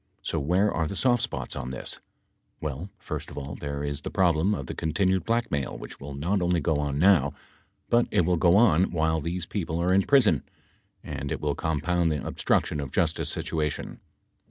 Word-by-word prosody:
So 80 - -1
where 90 +8 +2
are 80 -1 0
the 100 - -5
soft 120 +4 +2
spots 125 - -3
on 65 -2 -4
this? 65 - -4 0.6
Well, 75 +5 -4
first - - -6
of - - -11
all, 70 0 -5
there 70 0 -4
is 70 0 -3
the - - -4
problem 90 +2 +2
of 70 - -5
the - - -5
continued 95 +4 0
blackmail 115 - -1
which - - -9
will 70 0 -7
not 90 +8 0
only 90 0 +2
go 80 -2 +1
on 70 -1 -1
now, 80 -5 +4 0.5
but 120 0 +3
it - - +3
will 90 +1 +2
go 85 +3 +5
on 95 -6 +5
while 80 -1 +1
these 85 +2 -3
people 85 -4 -3
are 90 +2 +2
in 95 - +5
prison, 105 - +4 0.6
and 70 -1 -5
it - - -2
will 75 -1 0
compound 80 +3 0
the 75 -4 -2
obstruction 75 - 0
of 70 -3 -5
justice 80 -1 0
situation. 75 -2 -2
80 Hz, 195 wpm, -27 LUFS, 75-95 Hz, 0.6 s, go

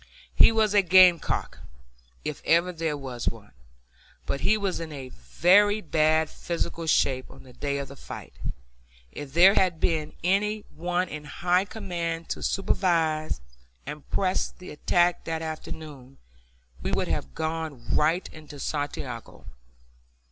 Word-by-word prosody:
He - - +7
was 220 -2 +2
a 205 - +6
gamecock 180 -2 +4 0.7
if - - -4
ever 170 +2 +3
there 160 -3 -2
was 130 -4 -6
one, 110 -3 -12 0.7
but 140 - -2
he 215 - +3
was 200 -3 -2
in 145 -6 -7
very 185 - +3
bad 155 -3 +2
physical 170 0 -4
shape 130 -4 +2
on 135 0 -14
the 130 -1 -15
day 140 +1 -2
of 140 0 -4
the 140 - -10
fight. - - -9 0.8
If 140 - -8
there 185 +4 +7
had 180 -5 +2
been 155 -2 0
any 210 +4 +1
one 180 +2 -1
in 150 -2 -7
high 180 +5 +1
command 170 -6 -4
to - - -3
supervise 160 - +1 0.4
and 145 +1 -8
press 185 -1 0
the 180 - -12
attack 175 +3 +2
that 160 0 -3
afternoon, 150 -4 -8 0.6
we - - -2
would - - 0
have 65 0 -3
gone 160 -6 -3
right 165 +5 +2
into 155 -2 -11
Santiago. 140 -5 -5
160 Hz, 140 wpm, -26 LUFS, 145-180 Hz, 0.8 s, He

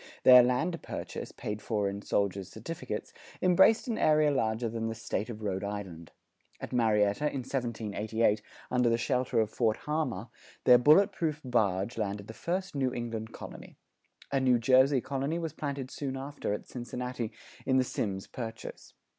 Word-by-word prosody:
Their 125 -1 +10
land 140 +8 0
purchase, - - -6
paid 105 0 -5
for 105 -3 -1
in 100 +1 -4
soldiers' 100 -2 -1
certificates, - - -6 0.3
embraced 185 +7 +5
an 230 - -1
area 155 -1 +4
larger 115 -3 0
than 115 0 -3
the 115 - -3
State 110 0 -3
of 110 -2 -7
Rhode 95 -2 -2
Island. 95 -5 -6 0.5
At - - -7
Marietta 110 +2 +2
in 140 -3 -2
1788, 110 -4 -1 0.3
under 125 -1 +3
the 115 - +2
shelter 125 -1 0
of 110 -1 +1
Fort 110 -3 +1
Harmar, 130 -9 -2 0.3
their 125 -1 +7
bullet 170 - +6
proof 160 -5 -2
barge 105 -3 0
landed 100 -1 -2
the 110 - -9
first 185 +8 -3
New 135 -3 0
England 115 -2 -4
colony. - - -10 0.5
A 135 - +2
New 130 -2 +4
Jersey 130 +2 +4
colony 140 +5 -2
was 165 -3 -4
planted 140 -4 -4
soon 135 -2 -4
after 140 -3 -4
at 105 - -3
Cincinnati 125 -1 -5 0.4
in 130 -1 +4
the 130 - +4
Symmes 95 -6 -3
Purchase. 115 -2 -8
120 Hz, 165 wpm, -30 LUFS, 110-140 Hz, 0.5 s, Their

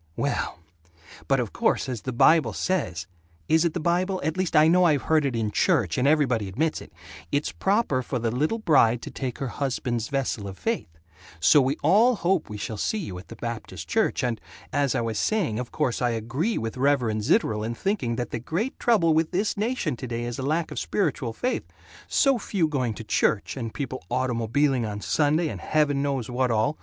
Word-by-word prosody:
"Well - - -2 0.7
But - - +3
of - - -3
course - - +1
as 125 -4 -4
the 130 - -4
Bible 125 -1 +4
says, 95 - -1 0.4
is 160 +1 +3
it 165 - 0
the - - 0
Bible, 180 +3 0
at 160 - -1
least 185 -2 -1
I 155 +1 +7
know 180 +2 +5
I 170 -3 +5
have 140 - -1
heard 155 -2 +2
it 130 - -3
in 110 -2 -1
church - - +2
and 130 - +2
everybody 130 -9 +2
admits 155 +12 -1
it, - - -13 0.4
it's 145 +1 0
proper 195 - +1
for 125 +1 -3
the 115 -1 -1
little 150 - 0
bride 125 - +3
to - - -6
take 130 -3 -4
her 135 - -3
husband's 120 -4 -2
vessel 130 -7 -2
of 95 -1 -8
faith, 225 - -2 0.5
so 145 - +6
we 135 +3 0
all 215 - +5
hope 185 -4 0
we 105 - -6
shall 105 +1 -5
see 220 - -1
you 95 - -5
at 90 - -13
the 115 - -10
Baptist 110 -8 -6
Church - - +1
and 120 -3 -1 0.3
As 140 -3 +1
I - - +1
was 115 -2 -2
saying, 180 - 0
of 125 - -5
course 130 -6 -1
I 125 - +2
agree 120 - -1
with 115 +2 -4
Reverend 125 -5 +1
Zitterel 110 - +1
in 115 +2 -3
thinking 145 - -1
that 120 -1 -4
the - - -3
great 175 - -3
trouble 195 -9 +3
with 160 0 +2
this 200 +4 0
nation 210 - -1
today 120 -1 -4
is 120 +1 -4
lack 155 +5 -1
of - - -3
spiritual 145 - -1
faith 250 - -2 0.4
so 275 -4 +3
few 190 -6 0
going 130 -7 -1
to 115 - -7
church, 105 -1 0
and 115 -4 -4
people 130 -1 -5
automobiling 130 +1 +1
on 105 -2 -4
Sunday 155 +8 +1
and - - -6
heaven 150 -2 +1
knows 140 -4 -1
what 125 +1 0
all. 115 +7 +1
135 Hz, 210 wpm, -25 LUFS, 115-165 Hz, 0.7 s, I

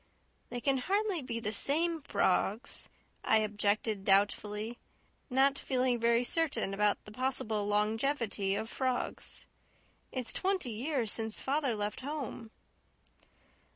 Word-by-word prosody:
"They 245 - -4
can 270 +1 +1
hardly 395 +3 0
be 240 -3 -4
the 215 -2 -2
SAME 320 +8 +2
frogs," 220 -1 +1 0.3
I 220 - +4
objected 210 -1 0
doubtfully, 210 +3 +1 0.5
not 275 +2 +3
feeling 255 -2 +1
very 235 +1 +3
certain 245 -8 +1
about 205 +1 +1
the 210 - -10
possible 220 -4 -1
longevity 210 -1 +1
of 220 - -2
frogs. 255 +1 -2 0.7
"It's 255 -3 -2
twenty 375 -9 0
years 240 0 -1
since 220 -1 0
father 275 -3 0
left 210 +2 -3
home." 265 -5 -5
235 Hz, 120 wpm, -32 LUFS, 210-275 Hz, 0.7 s, I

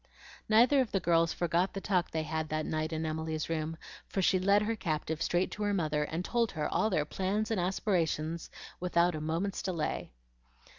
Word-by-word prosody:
Neither 245 +6 +6
of 245 - -2
the 195 - +1
girls 165 -1 +3
forgot 175 +3 0
the - - -1
talk 185 -3 0
they 160 -1 -2
had 160 0 -3
that 155 0 -1
night 155 0 -2
in 160 0 -2
Emily's 160 0 -3
room, 160 0 -2 0.3
for - - -3
she 185 0 +3
led 200 +3 +4
her 225 +2 0
captive 155 -4 -2
straight 175 +2 +1
to 210 - -7
her 205 -1 +1
mother, 150 -4 0
and 165 +4 -3
told 235 -3 +1
her 150 -2 -1
all 220 - +1
their 155 -7 +1
plans 200 +7 -1
and 220 - +1
aspirations 170 -4 -1 0.3
without 175 -1 +2
a 155 - -4
moment's 165 +6 -1
delay. 170 - -2
170 Hz, 195 wpm, -31 LUFS, 155-195 Hz, 0.3 s, Neither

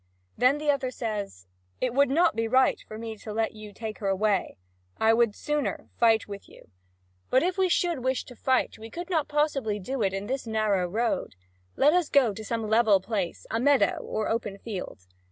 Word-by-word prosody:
Then 255 +5 +3
the 295 0 +2
other 275 -2 -1
says: 210 - -5 0.3
"It 250 -2 -1
would 280 +1 +4
not 325 +1 +3
be 225 0 0
right 260 +3 +3
for 215 - -8
me 225 0 -6
to 215 - -8
let 220 +1 0
you 215 -1 -10
take 215 +1 -7
her 200 - -3
away; 195 +1 0 0.4
I 220 0 +4
would 230 -2 +2
sooner 295 -9 -2
fight 225 -2 +4
with 200 -1 -9
you. - - -18 0.6
But 260 - +4
if 360 +1 0
we 380 -1 +2
should 345 -3 +1
wish 260 0 0
to 245 - -12
fight, 260 -1 0
we 225 +1 -9
could 350 +8 -7
not 315 -4 +1
possibly 290 -8 0
do 250 +6 -4
it 195 -2 +2
in 195 +1 -4
this 260 +2 -3
narrow 215 -4 +1
road. 220 - -1 0.4
Let 295 +3 +4
us 355 -3 +2
go 255 -7 +4
to 220 - -8
some 225 0 -3
level 220 -2 +4
place 195 -3 -3
a 225 - 0
meadow 280 +2 +3
or 215 - -3
an - - 0
open 210 -3 -3
field." 190 - -7
225 Hz, 210 wpm, -27 LUFS, 210-270 Hz, 0.6 s, would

